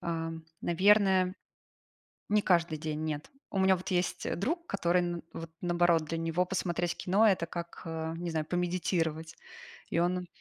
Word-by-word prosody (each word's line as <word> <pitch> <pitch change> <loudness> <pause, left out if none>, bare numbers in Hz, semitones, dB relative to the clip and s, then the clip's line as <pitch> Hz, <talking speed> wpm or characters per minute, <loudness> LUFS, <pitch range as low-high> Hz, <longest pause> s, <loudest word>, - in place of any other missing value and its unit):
Ам, 165 -1 -3 0.2
наверное, 190 0 +4 0.9
не 210 0 +3
каждый 170 -4 +2
день, 155 0 -3
нет. 150 -1 -4 0.2
У 195 - -2
меня 190 0 +5
вот 185 - -7
есть, 180 -1 0
э, - - -1
друг, 330 - -2
который 175 - +1
н 175 -1 -3
вот, 165 0 -7
наоборот— 175 -2 +3
для 165 +2 -3
него 165 +2 +1
посмотреть 175 -2 -1
кино 200 +5 +3
это 190 -5 +3
как, 170 0 -7
а, 160 0 -4
не 175 0 -4
знаю, 160 -1 -1
помедитировать, 170 -2 -1 0.5
и - - 0
он 180 +1 +1
175 Hz, 160 wpm, -30 LUFS, 165-185 Hz, 0.9 s, меня